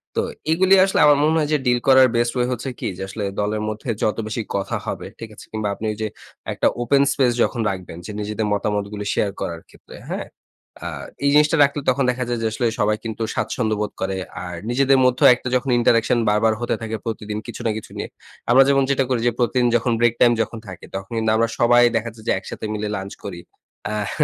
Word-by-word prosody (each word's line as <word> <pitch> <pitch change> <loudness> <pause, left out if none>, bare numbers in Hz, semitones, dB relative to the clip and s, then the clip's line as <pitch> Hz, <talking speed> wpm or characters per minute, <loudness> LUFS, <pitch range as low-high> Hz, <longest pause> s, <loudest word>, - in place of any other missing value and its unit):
তো - - +2 0.3
এগুলি 190 +4 +5
আসলে 195 - 0
আমার 145 -1 +6
মনে 155 +1 +3
হয় 150 -2 0
যে - - +4
ডিল 125 -1 +3
করার 130 -1 +7
বেস্ট 120 0 +1
ওয়ে 125 0 +1
হচ্ছে 125 +2 -3
কি - - -3
যে, - - -5
আসলে 105 +2 -5 0.2
দলের 105 +1 -1
মধ্যে 110 +4 -6
যত 105 - +1
বেশি 110 +2 -3
কথা 100 0 -1
হবে, - - -4
ঠিক 115 - -7
আছে? - - -12
কিংবা 110 -1 -2
আপনি 110 - -6
ওইযে 110 +1 -3 0.5
একটা - - +1
ওপেন 140 +3 +3
স্পেস 130 -3 +2
যখন 120 - -1
রাখবেন 90 -3 -6
যে 105 - -6
নিজেদের 105 +1 -2
মতামতগুলি 105 0 -2
শেয়ার 100 - 0
করার 85 -1 -4
ক্ষেত্রে, - - -15
হ্যাঁ? - - -4 0.6
আ - - -2 0.4
এই - - +5
জিনিসটা 150 +2 +4
রাখলে 145 +1 0
তখন 135 +2 +2
দেখা 125 0 -3
যায় 120 -1 -1
যে - - +2
আসলে 120 +2 0
সবাই 105 +1 +2
কিন্তু 115 0 -3
স্বাচ্ছন্দ্য 110 -3 -1
বোধ 105 - -2
করে। 95 0 -1 0.3
আর 90 0 -6
নিজেদের 135 +2 +3
মধ্যেও 125 0 +5
একটা 125 0 -6
যখন 130 +2 0
ইন্টারেকশন 115 0 +3
বারবার 105 +1 +3
হতে 120 - 0
থাকে 110 0 -3
প্রতিদিন 105 -2 -4
কিছু 120 - -7
না - - +2
কিছু 110 - -9
নিয়ে। - - -4 0.4
আমরা 130 +2 +8
যেমন 135 -1 +4
যেটা 135 0 +2
করি 125 -3 0
যে - - +3
প্রতিদিন 125 0 +2
যখন 120 +1 -1
ব্রেক 120 -1 +3
টাইম 120 -1 +6
যখন 115 +1 -8
থাকে, 95 - -10
তখন 95 +3 -6
কিন্তু 110 -1 +1
আমরা 115 +1 +2
সবাই 120 +1 +5
দেখা 115 +1 0
যাচ্ছে 110 0 -15
যে - - +4
একসাথে - - -7
মিলে 105 0 -3
লাঞ্চ 95 +1 -6
করি। 90 -4 -6 0.5
আহ 105 -2 -2
115 Hz, 220 wpm, -21 LUFS, 105-125 Hz, 0.6 s, আমরা